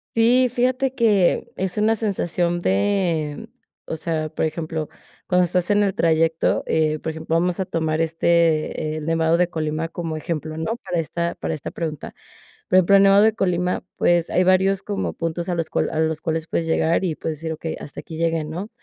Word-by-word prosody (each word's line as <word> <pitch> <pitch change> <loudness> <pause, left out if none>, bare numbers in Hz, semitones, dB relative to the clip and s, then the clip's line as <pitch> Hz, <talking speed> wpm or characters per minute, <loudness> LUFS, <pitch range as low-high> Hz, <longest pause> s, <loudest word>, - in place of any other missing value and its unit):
Sí, 245 +3 +4
fíjate 255 +2 0
que 210 -8 +2
es 185 -1 -3
una 220 +1 +3
sensación 175 -5 -1
de 165 - 0 0.4
o - - -4
sea, 155 -1 -2
por 160 - -1
ejemplo, 160 -1 -3 0.4
cuando 180 0 +3
estás 180 +1 0
en 205 0 +4
el 195 -2 +1
trayecto, 165 -1 +2
eh, 155 -1 +1
por 160 - -4
ejemplo, 160 +1 -3
vamos 180 +2 0
a 190 - 0
tomar, 160 -2 -1
este, 165 -1 +1
el 150 - -6
Nevado 165 0 +2
de 175 0 +2
Colima 155 0 -2
como 165 -2 -4
ejemplo, 155 0 -4
¿no?, 190 +9 -3
para 180 -8 -3
esta 170 +2 -2
para - - -3
esta 150 - -5
pregunta, 155 -3 -5 0.5
por - - +1
ejemplo, 190 +2 +6
el 195 - +5
Nevado 195 +1 +6
de 220 - +5
Colima, 180 -1 0
pues, 175 -1 +2
hay 185 - +2
varios 190 +1 +3
como 205 -2 -3
puntos 165 +1 -3
a 175 - -1
los 165 -1 -2
cual - - 0
a 160 - -2
los 160 -1 0
cuales 160 0 -2
puedes 165 - -1
llegar 165 +2 +1
y 160 - -1
puedes 155 -1 -4
decir: 160 +1 -4
"Okey, 160 +1 -5
hasta 140 - -9
aquí 160 - -9
llegué", 165 -1 0
¿no?, 175 +7 -6
170 Hz, 200 wpm, -22 LUFS, 160-185 Hz, 0.5 s, ejemplo